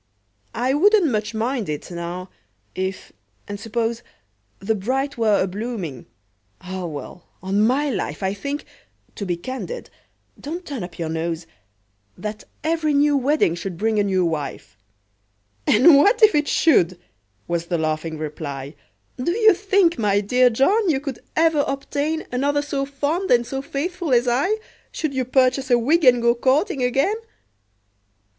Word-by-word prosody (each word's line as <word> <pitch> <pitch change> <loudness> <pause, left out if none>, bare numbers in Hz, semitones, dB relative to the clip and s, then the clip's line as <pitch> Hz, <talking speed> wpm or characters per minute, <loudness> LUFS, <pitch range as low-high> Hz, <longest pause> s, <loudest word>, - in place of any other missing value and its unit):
"I 250 +3 +1
wouldn't 380 0 +4
much 215 0 -2
mind 230 - -1
it, 150 +3 -5
now—if—and 175 - -8
suppose— 230 +2 -2 0.6
The 200 +3 -1
bride 265 +7 -2
were 220 -3 +2
a - - +2
blooming—Ah! 180 - -7
well—on 180 +5 -4
my 280 +4 +1
life, 155 - -3
I 190 0 0
think—to 280 -3 -8
be 175 -1 -1
candid—(don't 310 - -8
turn 275 - -5
up 175 -1 -9
your 165 -2 -3
nose!) 165 +1 -3 0.7
That 210 0 -6 0.2
every 315 -2 +1
new 290 +1 +4
wedding 275 - +2
should 175 0 -5
bring 220 +2 +1
a - - +3
new 190 -2 +1
wife!" 150 -9 -4 0.9
"And 265 +9 +7
what 415 - +4
if 430 - +8
it 295 -1 +2
should?" 185 - +3 0.5
was 170 0 -2
the 170 - 0
laughing 155 0 -2
reply; 145 -2 -6 0.5
"Do 340 - +1
you 435 +2 +5
think, 380 - +2
my 205 -2 +2
dear 250 +5 +3
John, 370 - +2
you 280 -4 +2
could 275 -3 -6 0.2
ever 320 -2 +3
obtain 290 +3 -2
Another 285 +3 +1
so 275 -2 -2
fond 295 +7 -2
and 240 -1 +4
so 270 +2 -4
faithful 320 +3 -3
as 240 +1 +3
I, 280 - +2 0.3
Should 310 -4 -3
you 260 -1 -1
purchase 260 +1 +2
a 245 - +5
wig, 305 +8 +2
and 245 -2 +5
go 235 0 +5
courting 275 - +1
again?" 270 - +1
245 Hz, 145 wpm, -22 LUFS, 185-290 Hz, 0.9 s, if